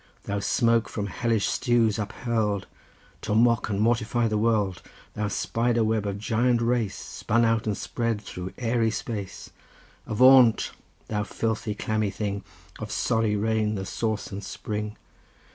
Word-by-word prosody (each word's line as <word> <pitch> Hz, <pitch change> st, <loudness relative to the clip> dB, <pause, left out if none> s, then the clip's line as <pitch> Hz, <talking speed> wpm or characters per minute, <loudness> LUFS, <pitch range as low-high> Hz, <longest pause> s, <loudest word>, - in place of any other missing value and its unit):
Thou 100 Hz, 0 st, -2 dB
smoke 115 Hz, +2 st, +2 dB
from 105 Hz, -, -3 dB
hellish 110 Hz, +3 st, 0 dB
stews 115 Hz, -4 st, +2 dB
uphurl'd 105 Hz, -1 st, -1 dB, 0.6 s
To 105 Hz, -, -1 dB
mock 115 Hz, 0 st, +3 dB
and 100 Hz, -2 st, -1 dB
mortify 115 Hz, +1 st, +2 dB
the 110 Hz, -, -1 dB
world! 105 Hz, -5 st, +1 dB, 0.3 s
Thou 105 Hz, 0 st, -2 dB
spider 115 Hz, +3 st, 0 dB
web 110 Hz, -1 st, 0 dB
of 100 Hz, -1 st, -3 dB
giant 115 Hz, +3 st, +1 dB
race, 115 Hz, -3 st, 0 dB
Spun 115 Hz, +2 st, 0 dB
out 115 Hz, -1 st, +1 dB
and 105 Hz, -, 0 dB
spread 115 Hz, -3 st, -2 dB
through 90 Hz, -2 st, -7 dB
airy 115 Hz, -2 st, +1 dB
space! 105 Hz, -3 st, -5 dB, 0.6 s
Avaunt, 125 Hz, +1 st, +6 dB, 0.4 s
thou 105 Hz, -1 st, -1 dB
filthy, 110 Hz, 0 st, -2 dB
clammy 110 Hz, 0 st, -1 dB
thing, 100 Hz, -1 st, -3 dB, 0.4 s
Of -, -, -6 dB
sorry 110 Hz, -2 st, +1 dB
rain 110 Hz, 0 st, 0 dB
the 95 Hz, -1 st, -4 dB
source 110 Hz, +2 st, -2 dB
and 100 Hz, +1 st, -6 dB
spring! 105 Hz, +2 st, -5 dB
110 Hz, 145 wpm, -26 LUFS, 105-115 Hz, 0.6 s, Avaunt